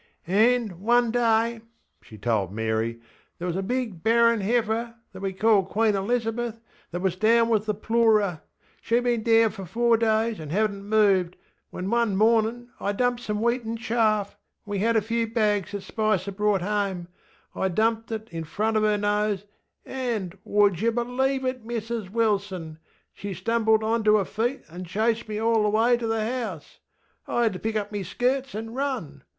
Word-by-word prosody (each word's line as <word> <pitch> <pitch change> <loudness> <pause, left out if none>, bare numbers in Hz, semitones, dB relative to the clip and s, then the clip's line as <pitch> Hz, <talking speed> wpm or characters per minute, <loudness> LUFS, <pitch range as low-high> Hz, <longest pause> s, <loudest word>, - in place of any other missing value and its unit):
ŌĆśAnŌĆÖ, 225 +4 +3
one 235 +3 +3
day, 245 - +1
ŌĆÖ 230 0 +2 0.4
she 110 - -14
told 105 -3 0
Mary, 110 +2 -1 0.4
ŌĆśthere 175 - -4
was 175 -1 -2
a 190 - -1
big 225 -4 -3
barren 230 +1 +4
heifer 230 +2 0 0.2
(that 190 - -9
we 195 -1 -1
called 200 -1 +2
Queen 220 0 +2
Elizabeth) 230 +2 -1 0.3
that 175 +1 -4
was 190 -2 0
down 230 +3 +3
with 220 -1 +1
the 210 - 0
ploorer. 215 -5 +2 0.4
SheŌĆÖd 235 +1 +1
been 240 -2 +1
down 225 0 +4
for 195 -3 -8
four 235 +4 +2
days 220 -1 +1
and 155 -2 -7
hadnŌĆÖt 200 +1 0
moved, 200 -4 +2 0.3
when 180 - -5
one 235 -4 +2
morninŌĆÖ 225 +3 +2
I 200 - -1
dumped 245 +2 0
some 210 -2 -3
wheaten 235 -1 0
chaffŌĆöwe 215 -3 -2
had 230 +3 +2
a 220 - +4
few 230 +1 -1
bags 210 -4 0
that 200 -1 -4
Spicer 215 -3 -1
brought 205 -1 +1
homeŌĆö 195 -2 -1 0.5
I 190 - 0
dumped 225 +4 0
it 220 0 -4
in 165 -1 -4
front 215 +7 -1
of - - +2
her 210 -1 +2
nose, 205 -1 0 0.4
anŌĆÖŌĆöwould 205 -5 0
yer 230 +1 +2
bŌĆÖlieve 255 +1 -1
me, 235 +2 -5
Mrs 225 -3 -5
Wilson? 200 -6 -1
ŌĆö 155 - -14 0.4
she 200 -1 -6
stumbled 220 0 +2
onter 220 -1 +3
her 200 - 0
feet 240 +6 -2
anŌĆÖ 175 +3 -9
chased 220 +5 0
me 210 - -3
all 225 0 +2
the 210 - +2
way 225 +3 +3
to 235 -1 -3
the 225 -1 0
house! 225 - -5 0.5
I 240 - +1
had 225 -3 +2
to 185 - -6
pick 220 0 -3
up 205 -1 -2
me 205 -1 -3
skirts 260 +8 -1
anŌĆÖ 225 +2 -6
run! 235 - -3
220 Hz, 180 wpm, -25 LUFS, 200-230 Hz, 0.5 s, barren